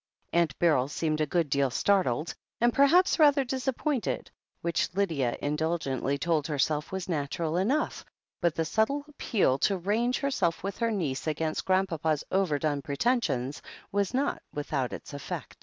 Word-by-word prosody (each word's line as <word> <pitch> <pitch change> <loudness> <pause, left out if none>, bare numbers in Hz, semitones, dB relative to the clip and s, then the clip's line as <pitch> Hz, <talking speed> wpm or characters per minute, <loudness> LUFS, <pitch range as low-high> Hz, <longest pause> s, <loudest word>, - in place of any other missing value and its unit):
Aunt 170 -5 +2
Beryl 150 -7 +3
seemed 155 +1 -1
a 155 - +1
good 170 0 +1
deal 140 -1 +2
startled, 165 -2 +1 0.3
and 240 +1 +3
per 280 0 +6
haps 355 +4 +4
rather 290 -2 +6
disappointed, 265 - -2 0.3
which 170 0 0
Lydia 160 -12 0
indulgently 145 -2 -1
told 155 0 0
herself 150 0 0
was 190 -1 -4
natural 160 0 -2
enough, 245 +12 0 0.4
but 170 -2 +2
the 165 - 0
subtle 250 - 0
appeal 200 - +1
to 195 +5 +2
range 220 +7 0
herself 245 -14 0
with 195 +2 -4
her 230 -1 +1
niece 165 -11 -2
against 155 +1 -1
Grandpapa's 165 -5 +1
over 185 -6 +2
done 145 -1 -1
pretensions 140 - 0 0.3
was 200 -1 0
not 270 +3 0
without 145 -3 -2
its - - -8
effect. 140 - -6
170 Hz, 155 wpm, -28 LUFS, 145-220 Hz, 0.4 s, per